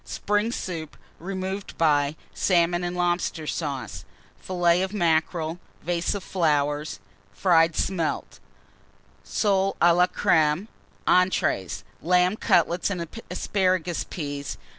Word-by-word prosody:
_ - - -25
Spring 210 +2 0
Soup, 165 -9 -5 0.2
removed 190 +2 -5
by 145 -2 +2 0.2
Salmon 175 -1 +2
and 175 0 -3
Lobster 175 -2 0
Sauce. 130 - -4 0.3
Fillet 175 -1 +1
of 190 +2 -2
Mackerel. 165 -1 0 0.2
Vase 170 +2 -1
of 200 - -5
Fried 150 -4 +1
Smelts. - - -6 0.9
Flowers. 165 -6 -3 0.8
Soles 195 -2 +1
a 170 0 +6
la 180 +1 +4
Crême. 160 +3 +2 0.4
Entrées. 180 - +2 0.2
Lamb 180 +3 +3
Cutlets 175 -3 +2
and 175 -4 -3 0.2
Asparagus 185 -3 0
Peas. 145 -4 -5
175 Hz, 110 wpm, -25 LUFS, 155-185 Hz, 0.9 s, a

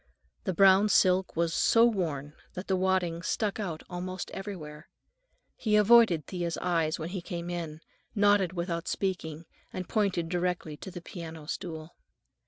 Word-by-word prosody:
The 190 - 0
brown 195 +3 +6
silk 185 -1 +3
was 165 0 +1
so 230 +6 +5
worn 155 -10 -1 0.2
that 185 - -5
the 190 - +2
wadding 185 -3 0
stuck 210 +5 -1
out 175 -7 -4
almost 185 +1 -5
everywhere. 160 -6 -8 0.7
He 215 -3 0
avoided 210 -7 +6
Thea's 175 -1 -3
eyes 165 -3 0
when 160 +1 -5
he 185 0 -4
came 175 -1 -5
in, 160 -3 -5 0.3
nodded 205 -3 +4
without 170 -1 -3
speaking, 170 -4 -3 0.3
and 185 -2 -5
pointed 190 -5 0
directly 175 -3 -2
to 190 - -8
the 175 -1 -8
piano 160 -4 -8
stool. 160 -1 -6
180 Hz, 150 wpm, -29 LUFS, 165-195 Hz, 0.7 s, brown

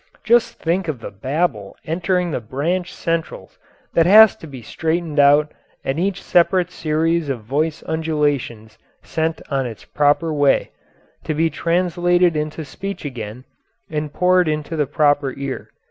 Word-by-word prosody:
Just 235 0 +3
think 170 +2 -1
of 150 -6 -3
the - - -8
babel 115 - -2
entering 175 +2 0
the 130 - -2
branch 165 +11 -2
centrals 165 -1 -4 0.3
that 165 0 +4
has 215 +2 +8
to 160 - -11
be 130 -5 -10
straightened 160 +3 -2
out 145 +2 +5 0.3
and 135 +4 -2
each 195 +1 -1
separate 180 0 +2
series 165 -1 0
of 125 -5 -3
voice 150 +7 -1
undulations 145 -9 -2 0.2
sent 160 0 -2
on 135 -2 0
its 115 -3 -10
proper 150 +2 +1
way, 145 -2 +2 0.5
to 155 - -2
be 160 +1 +1
translated 175 0 +1
into 155 +1 -3
speech 195 +4 -7
again 125 -2 -7 0.5
and 150 -1 -3
poured 180 +1 +3
into 155 +1 -2
the 150 -3 0
proper 145 -2 +1
ear. 140 -1 -5
155 Hz, 145 wpm, -20 LUFS, 140-175 Hz, 0.5 s, has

